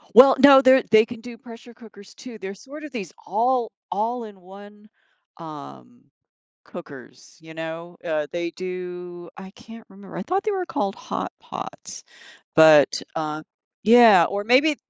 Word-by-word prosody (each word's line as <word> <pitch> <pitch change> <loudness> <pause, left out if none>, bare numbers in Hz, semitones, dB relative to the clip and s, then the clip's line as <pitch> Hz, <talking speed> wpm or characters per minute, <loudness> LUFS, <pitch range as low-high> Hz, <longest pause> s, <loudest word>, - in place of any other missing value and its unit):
Well, 260 +3 +8
no 275 0 +8
they're 260 -1 +5
they 220 0 +6
can 235 -1 -11
do 240 -1 -11
pressure 235 0 -14
cookers 210 -4 -17
too. 250 -4 -12
They're 195 -1 -8
sort 280 +9 -13
of 305 - -10
these 195 - -7
all 235 +3 0 0.2
all 230 +4 -2
in 205 -3 -14
one, 205 +3 -16 0.5
um, 70 - -12 0.6
cookers, - - -13
you 160 0 -14
know? 165 +2 -8
Uh, 155 -3 -2
they 170 -1 -4
do 180 -1 -8
I 190 -1 -11
can't 225 +2 -15
remember. 195 0 -14
I 180 - -4
thought 375 - -2
they 430 - -1
were 375 -2 -3
called 200 -8 -3
hot - - -6
pots. - - -10 0.5
But, 155 -3 +6
uh 155 -1 -4 0.4
Yeah, 220 -5 +7
or 200 +3 -4
maybe 265 +7 +3
205 Hz, 155 wpm, -22 LUFS, 175-240 Hz, 0.6 s, Well